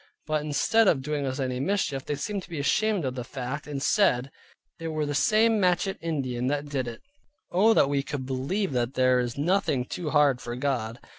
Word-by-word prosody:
But 155 0 0
instead 155 +9 +2
of 135 -7 +3
doing 150 -1 -2
us 130 +2 -3
any 130 -1 -2
mischief, 145 -4 -1
they 145 - -2
seemed 195 +8 -3
to 180 - -13
be 165 - -5
ashamed 205 +4 +1
of 130 - -2
the 125 -1 -5
fact, 135 +4 -5
and 140 -2 -4
said, 135 - +2 0.5
it 165 - -4
were 155 -1 -1
some 215 +9 +3
matchit 180 +1 +1
Indian 130 -7 -2
that 145 +1 -1
did 135 -3 -2
it. 115 -1 -8 0.5
Oh, 215 +5 +4
that - - +5
we 140 0 +1
could 140 -1 -5
believe 135 +8 -2
that 125 +1 -1
there 130 -1 +4
is 120 0 -2
nothing 150 -5 +1
too 165 +4 -4
hard 145 -4 +3
for 120 0 -5
God! 125 -4 -2
145 Hz, 205 wpm, -27 LUFS, 130-175 Hz, 0.5 s, that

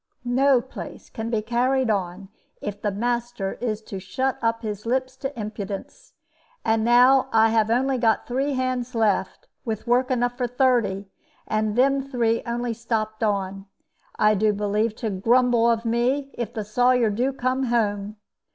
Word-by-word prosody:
No 260 +1 +3
place 260 - -10
can 225 0 -4
be 220 -2 -1
carried 250 +2 +1
on 190 -1 -3 0.3
if 205 -1 -6
the 210 - 0
master 235 -1 -2
is 220 -3 -2
to 195 -2 -7
shut 260 +7 -2
up 230 0 0
his 215 0 -5
lips 255 +1 -1
to 270 -1 -5
impudence. 210 - -6 0.5
And 220 0 +2
now 250 +3 +5
I 225 0 +5
have 220 -1 +2
only 260 +2 +1
got 225 -2 +2
three 270 +3 -1
hands 255 -1 -2
left, 205 -4 0 0.2
with 220 -3 -4
work 250 +2 +2
enough 245 -1 0
for 250 -1 0
thirty, 230 -6 +1 0.4
and 215 -1 0
them 275 +2 +3
three 240 -4 0
only 240 0 -2
stopped 220 -1 -3
on, 195 -2 -1 0.5
I 215 0 +4
do 215 +1 +2
believe, 210 +2 0
to 220 -2 -3
grumble 235 +4 +3
of 230 0 0
me 255 +5 0
if 235 -3 -4
the 220 -3 -4
Sawyer 245 +1 +3
do 245 +6 0
come 260 0 -1
home! 210 -4 0
235 Hz, 160 wpm, -24 LUFS, 215-250 Hz, 0.5 s, now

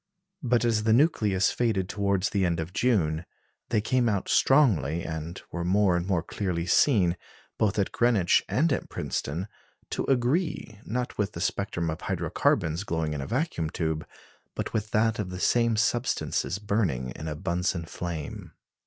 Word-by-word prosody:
But 120 -3 +2
as 115 -2 +2
the 110 - +4
nucleus 110 - +3
faded 110 -6 0
towards 100 -1 0
the 100 -2 +1
end 85 -2 +1
of 80 +3 -5
June, 85 -10 +1 0.5
they 110 -3 +2
came 120 +2 +2
out 100 -3 -1
strongly, 90 - +3
and 80 +2 -5
were 85 - -3
more 95 +1 +3
and 85 +1 -1
more 90 -4 +1
clearly 85 -2 -2
seen, 90 -3 +4 0.4
both 105 -2 +1
at 100 - +1
Greenwich 115 -7 +3
and 155 +2 +2
at - - -3
Princeton, 85 +8 -3 0.4
to - - -1
agree, 130 - 0
not 125 0 -3
with 105 - 0
the - - -6
spectrum 85 -2 -1
of 80 - -6
hydro - - -3
carbons 80 +3 +1
glowing 80 -5 -2
in 75 - -3
a - - -5
vacuum 120 - -1
tube, 80 -1 -2 0.5
but - - -4
with 105 -1 -1
that 110 +1 +1
of 100 -3 -2
the 90 0 -6
same 115 +3 +3
substances 115 -3 0
burning 95 - -1
in 80 - -7
a 75 - -3
Bunsen 85 0 -1
flame. 80 -3 -6
100 Hz, 170 wpm, -27 LUFS, 85-115 Hz, 0.5 s, the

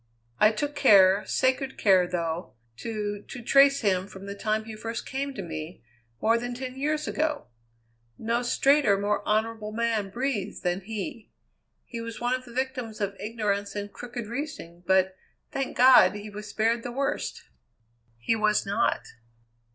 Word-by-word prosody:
I 215 - +6
took 290 +7 -3
care, 200 -7 +6
sacred 260 +1 0
care, 185 -3 +4
though, 170 -1 -3 0.2
to 205 - -4
to 245 - -8
trace 275 +3 +5
him 190 -3 +1
from 195 -1 -11
the 200 - -5
time 215 +1 -1
he 220 -1 -7
first 225 +2 -5
came 275 +1 -3
to 195 - -4
me, 160 -1 -7 0.4
more 230 +1 +3
than 245 +1 -4
ten 255 0 -5
years 300 +3 -1
ago. 300 -1 -1 0.7
No 230 +2 0
straighter, 260 -3 +3
more 205 +1 0
honourable 215 0 0
man 225 -3 0
breathes 235 -3 -3
than 180 +1 -1
he. 225 - -6 0.6
He 235 -2 -6
was 230 0 -6
one 245 +1 0
of 255 0 -3
the 240 - -12
victims 250 -3 -3
of 200 -1 -2
ignorance 205 -2 -2
and 205 0 -5
crooked 245 -1 -6
reasoning, 235 - -6
but, 190 0 +3 0.4
thank 270 -1 -3
God! 250 -7 +7
he 210 +1 -7
was 210 0 -8
spared 230 +3 +1
the 245 - -5
worst." 275 +2 -2 0.7
"He 115 - 0
was 215 -1 +2
not." 200 +1 +1
220 Hz, 160 wpm, -27 LUFS, 200-250 Hz, 0.7 s, God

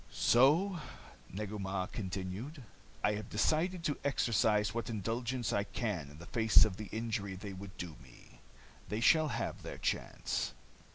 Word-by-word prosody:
"So," 165 +10 +4 0.5
Negu 105 +2 -4
Mah 95 -1 -1
continued, 100 - -5 0.4
"I 105 - +4
have 105 0 -4
decided 165 - +1
to 150 -3 -1
exercise 105 -6 +2
what 115 +1 -3
indulgence 115 +3 -1
I 100 - +2
can 100 -9 -3
in 75 - -13
the 85 - -10
face 110 +2 +6
of 100 -3 -3
the 105 - -5
injury 110 -4 -2
they 100 +1 -7
would 95 +1 -9
do 85 -3 -5
me. 65 -2 -17 0.5
They 105 - -1
shall 155 +6 +5
have - - -3
their - - -6
chance." - - -2
105 Hz, 155 wpm, -34 LUFS, 95-125 Hz, 0.5 s, face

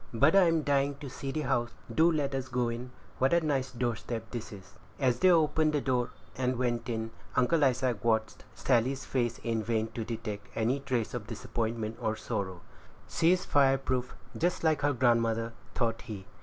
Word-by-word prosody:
But 140 +9 +5
I'm 165 -5 +5
dying 140 0 +1
to 140 -2 -8
see 135 - -5
the 155 - -2
house; 120 -4 0 0.2
do 165 +7 +5
let 145 -3 0
us 135 -1 -2
go 125 -2 0
in; 120 +2 -5 0.3
what 130 +3 +3
a 170 - +4
nice 135 -4 0
doorstep 115 -2 -3
this 120 -2 -5
is!" 100 -3 -12 0.3
As 125 -3 +2
they 185 - +5
opened 155 -2 +3
the 150 - +2
door 125 -3 0 0.3
and 130 -1 0
went 120 -1 -1
in, 115 -1 -2 0.2
Uncle 145 +5 +3
Isaac 125 -4 +1
watched 110 -1 0
Sally's 130 +1 +1
face 120 -3 -1
in 115 -1 0
vain 110 0 -1
to 115 - -3
detect 110 -2 -5
any 120 +5 +1
trace 130 -5 -2
of 115 -4 -5
disappointment 115 -1 -3
or 110 - 0
sorrow. 95 -4 -4 0.5
She 165 +1 +3
is 180 0 +1
fire 135 -1 +4
proof, 130 -2 -2 0.2
just 175 +1 0
like 155 -3 +2
her 145 0 +2
grandmother, 115 -2 +2 0.2
thought 115 -2 0
he. 105 -5 -7
125 Hz, 185 wpm, -30 LUFS, 115-140 Hz, 0.5 s, But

